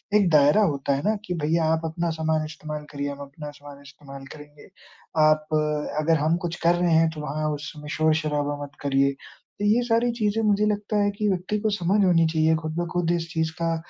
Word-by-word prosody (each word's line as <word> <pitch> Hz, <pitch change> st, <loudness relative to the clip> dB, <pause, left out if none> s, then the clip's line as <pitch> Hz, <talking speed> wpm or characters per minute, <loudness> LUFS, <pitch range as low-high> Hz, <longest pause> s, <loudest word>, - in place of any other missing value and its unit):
एक 200 Hz, -4 st, +4 dB
दायरा 150 Hz, +6 st, +5 dB
होता 140 Hz, -6 st, 0 dB
है 140 Hz, -, -4 dB
ना? 215 Hz, +1 st, +2 dB
कि 180 Hz, -, -3 dB
भैया, 160 Hz, +1 st, +2 dB
आप 160 Hz, -, 0 dB
अपना 170 Hz, +1 st, -2 dB
सामान 155 Hz, -1 st, 0 dB
इस्तेमाल 155 Hz, -1 st, -7 dB
करिए, 145 Hz, 0 st, -3 dB
हम 140 Hz, -, -9 dB
अपना 150 Hz, +2 st, -9 dB
सामान 145 Hz, -1 st, -13 dB
इस्तेमाल 140 Hz, -1 st, -12 dB
करेंगे। 150 Hz, -1 st, -14 dB, 0.5 s
आप 155 Hz, 0 st, +4 dB, 0.5 s
अगर 160 Hz, +1 st, +2 dB
हम 155 Hz, +3 st, +2 dB
कुछ 170 Hz, -, -3 dB
कर 170 Hz, +1 st, +4 dB
रहे 175 Hz, 0 st, +1 dB
हैं, 160 Hz, 0 st, +4 dB
तो 155 Hz, -1 st, -7 dB
वहाँ 155 Hz, +1 st, -2 dB
उस 150 Hz, +1 st, -6 dB
समय 150 Hz, -1 st, -10 dB
शोर-शराबा 150 Hz, -2 st, 0 dB
मत 145 Hz, +1 st, -10 dB
करिए। 140 Hz, -1 st, +2 dB
तो 200 Hz, +8 st, -10 dB
ये 225 Hz, +4 st, +3 dB
सारी 240 Hz, 0 st, +1 dB
चीज़ें, 215 Hz, +2 st, +1 dB
मुझे 210 Hz, 0 st, +3 dB
लगता 210 Hz, 0 st, -1 dB
है 205 Hz, -, +2 dB
कि 210 Hz, -1 st, +1 dB
व्यक्ति 190 Hz, +3 st, -1 dB
को 215 Hz, -, 0 dB
समझ 195 Hz, +4 st, +2 dB
होनी 165 Hz, -3 st, +4 dB
चाहिए, 160 Hz, 0 st, +2 dB
खुद 155 Hz, 0 st, -4 dB
ब 175 Hz, -, -1 dB
खुद 175 Hz, -1 st, 0 dB
इस 170 Hz, -1 st, -2 dB
चीज़ 160 Hz, -1 st, 0 dB
का 165 Hz, 0 st, +1 dB
160 Hz, 215 wpm, -24 LUFS, 150-175 Hz, 0.5 s, दायरा